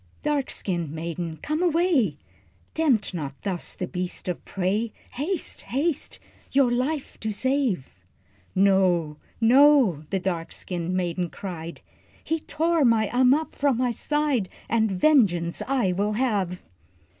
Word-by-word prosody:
"Dark 295 -2 0
skinned 175 -5 -3
maiden, 165 +1 -4
come 305 +2 -1
away, 330 - +2 0.6
Tempt 265 -12 +2
not 140 -5 -5
thus 185 -4 -3
the 180 - -3
beast 180 0 -5
of 180 - -3
prey, 200 +4 -1 0.2
Haste, 310 +7 -3
haste, 285 +4 -2 0.3
your 270 -3 +4
life 265 +4 -2
to 220 - -2
save." 255 - 0 0.6
"No, 185 -5 +3 0.2
no," 240 - +5
the 195 - 0
dark 175 -3 -3
skinned 175 0 -4
maiden 175 -1 -1
cried, 170 -3 -7 0.4
"He 325 0 -1
tore 325 +1 +1
my 225 -4 +3
Ammap 260 +5 +3
from 280 -4 +1
my 250 0 +1
side, 285 -5 0 0.2
And 220 -1 +2
vengeance 185 - +3
I 255 -8 +2
will 200 +4 0
have!" 205 -7 -1
215 Hz, 130 wpm, -25 LUFS, 180-275 Hz, 0.6 s, no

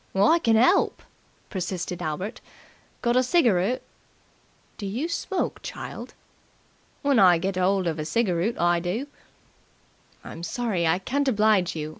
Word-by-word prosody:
"I 210 - +4
can 230 -7 +3
'elp!" 255 - +3 0.5
persisted 180 -2 -4
Albert. 175 +6 -4 0.6
"Got 240 0 +2
a - - +5
cigaroot?" 245 - +2 1.0
"Do 200 - -4
you 240 +11 -2
smoke, 360 +2 -2
child?" - - -8 0.9
"When 280 -4 +3
I 180 -3 +6
get 190 +3 -2
'old 185 +1 +1
of 165 -2 -2
a - - -2
cigaroot 195 +3 0
I 175 0 +3
do." 180 +10 -3 1.2
"I'm 165 - -9
sorry 195 -4 -1
I 165 +2 +3
can't 275 +9 -1
oblige 210 -7 +2
you. 155 -1 -4
195 Hz, 135 wpm, -25 LUFS, 175-240 Hz, 1.2 s, I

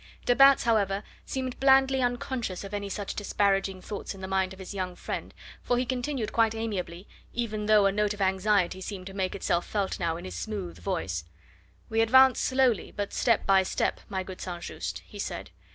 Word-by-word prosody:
De 245 - +4
Batz, 275 +1 +7
however, 205 -3 +1 0.2
seemed 260 -2 -3
blandly 270 0 +5
unconscious 245 -5 -2
of 195 +1 -8
any 205 -1 -3
such 200 0 -4
disparaging 195 -2 0
thoughts 205 -1 -5
in 190 - -11
the 190 - -4
mind 190 -1 0
of 190 - -10
his 190 +1 -8
young 185 -2 -3
friend, - - -5 0.3
for 245 - +1
he 250 - +1
continued 250 -2 -2
quite 225 -1 +3
amiably, 195 -5 -4 0.3
even 215 -3 -2
though 210 -2 +6
a 195 - +4
note 210 +1 +1
of - - -16
anxiety 190 -1 +2
seemed 190 -1 -6
to 195 - -8
make 190 -1 -2
itself 175 - 0
felt 200 -2 -2
now 165 -2 0
in 175 - -8
his 185 - -6
smooth 200 -6 -5
voice: 95 - -2 0.6
"We 225 0 +1
advance 260 +3 +6
slowly, 260 -5 +2
but 205 -1 -4
step 230 -3 +2
by 195 -1 +5
step, 190 - -1
my 190 -2 -2
good 185 0 -9
St. 175 -2 -5
Just," - - -5
he - - -11
said. - - -5
205 Hz, 200 wpm, -28 LUFS, 190-235 Hz, 0.6 s, Batz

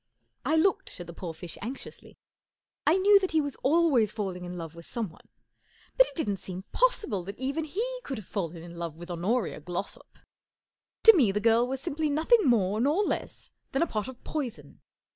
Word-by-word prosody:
I 305 +5 +2
looked 385 - +1
at 175 - -6
the 170 - -9
poor 170 0 -5
fish 160 +1 -7
anxiously. 250 +6 -8 0.7
I 320 +5 +6
knew 400 +1 +6
that 375 -3 -2
he 320 - +4
was 285 -2 -2
always 280 - +3
falling 190 -5 -4
in 175 0 -6
love 165 -2 -6
with 170 0 -12
someone, 215 -9 -5 0.7
but - - +6
it - - -9
didn't 205 - 0
seem 185 0 -7
possible 420 - +1
that 200 +2 -7
even 280 +5 -2
he 480 +10 -3
could 270 - -4
have 215 - -8
fallen 170 -5 -4
in 170 0 -10
love 170 -2 -4
with 175 +2 -8
Honoria 195 +7 -1
Glossop. 175 +5 -6 0.9
To 450 - +11
me 250 - +4
the 205 - 0
girl 230 +2 +4
was 265 0 -3
simply 305 +2 -1
nothing 330 +10 +4
more 215 -4 +3
nor 300 +10 +3
less - - -3 0.2
than 270 - +3
a - - +2
pot 215 -7 -3
of 260 -1 -10
poison. 235 - -5
235 Hz, 195 wpm, -28 LUFS, -, 0.9 s, To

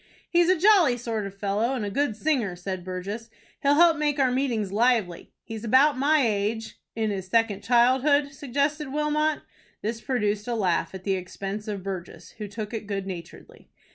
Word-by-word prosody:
"He's 345 0 +3
a 370 - +4
jolly 355 - +5
sort 225 -4 -3
of 195 0 -12
fellow, 210 +6 0
and 225 -5 -2
a 200 - -4
good 280 -1 0
singer," 235 - 0
said 180 0 -5
Burgess. 195 +5 -5 0.3
"He'll 285 +1 +4
help 335 0 +5
make 295 -1 0
our 260 -2 +3
meetings 240 -7 -1
lively. 215 -5 +1
He's 225 -1 -7
about 265 +6 +4
my 285 +1 +3
age 220 +1 -2
" - - -61
"In 220 -1 0
his 190 -2 -4
second 215 -1 +1
childhood," 260 +5 +3
suggested 285 +2 -2
Wilmot. 300 +1 0 0.4
This 225 +2 -3
produced 210 -5 -1
a 240 - -1
laugh 190 -3 0
at 190 - -8
the 195 - 0
expense 195 +3 -5
of 200 -3 -4
Burgess, 185 -3 -7
who 210 - -4
took 210 +2 -6
it 220 -2 -5
good 195 -2 -3
naturedly. 180 -3 -10
225 Hz, 185 wpm, -26 LUFS, 200-280 Hz, 0.4 s, jolly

